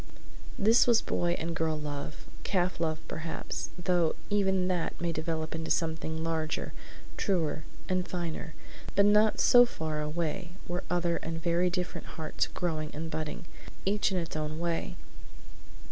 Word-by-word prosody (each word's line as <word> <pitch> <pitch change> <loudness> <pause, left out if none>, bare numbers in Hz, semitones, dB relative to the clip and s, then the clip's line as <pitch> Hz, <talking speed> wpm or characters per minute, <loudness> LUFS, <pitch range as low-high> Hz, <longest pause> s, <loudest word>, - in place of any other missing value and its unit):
III - - -18 0.4
This 230 +3 +7
was 235 -2 +6
boy 175 0 0
and 165 +1 -3
girl 160 -1 +1
love, 145 0 -5 0.2
calf 180 -3 +1
love, 160 -2 +1
perhaps, 160 +1 -4
though 175 -2 +2 0.2
even 190 -3 +3
that 180 -3 -1
may 170 -1 0
develop 160 0 -2
into 160 0 -3
something 160 -1 0
larger, 160 -1 -1 0.4
truer, 165 -5 0 0.2
and 185 -1 0
finer; 165 -3 -4 0.4
but 200 - +6
not 210 +1 +5
so 245 0 +8
far 160 -10 -2
away 165 +3 -2
were 175 +1 -2
other 175 -1 +1
and 165 0 -4
very 170 +2 +2
different 180 0 -3
hearts 160 -1 0
growing 155 -4 -2
and 160 +2 -4
budding, 155 +3 -3 0.4
each 205 +1 +2
in 190 - +1
its 165 -2 -3
own 155 0 -2
way. 170 - -1
170 Hz, 150 wpm, -30 LUFS, 160-180 Hz, 0.4 s, so